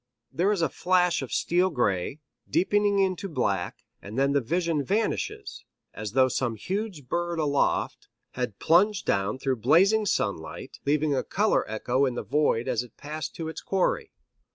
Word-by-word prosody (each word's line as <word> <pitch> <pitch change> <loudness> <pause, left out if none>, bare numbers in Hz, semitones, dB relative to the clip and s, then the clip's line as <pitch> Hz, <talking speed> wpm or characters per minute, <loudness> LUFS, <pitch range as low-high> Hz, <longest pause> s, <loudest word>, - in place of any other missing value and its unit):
There 175 +9 +1
is 195 -5 0
a - - +3
flash 180 -2 +2
of 130 -4 -6
steel 180 +2 +2
gray, 125 - -1 0.3
deepening 200 +5 +2
into 195 0 0
black, 100 - -2 0.2
and 105 +4 -8
then 140 +1 +3
the 140 - +3
vision 165 +2 0
vanishes 210 +7 -2 0.3
as 105 0 -6
though 130 0 +5
some 125 -2 -1
huge 185 - -4
bird 175 +3 -1
aloft 145 -3 0 0.2
had 125 -5 -4
plunged 190 +3 +3
down 100 +3 0
through 130 -1 -1
blazing 195 - +4
sunlight, 100 - -3
leaving 150 0 +2
a 130 - 0
color 210 +2 +1
echo 125 +5 +1
in 125 - -3
the - - -3
void 140 -5 +1
as 115 - +1
it 125 -3 -13
passed 155 +2 -6
to 165 - -5
its 160 - -6
quarry. 190 -1 0
150 Hz, 165 wpm, -26 LUFS, 125-180 Hz, 0.3 s, though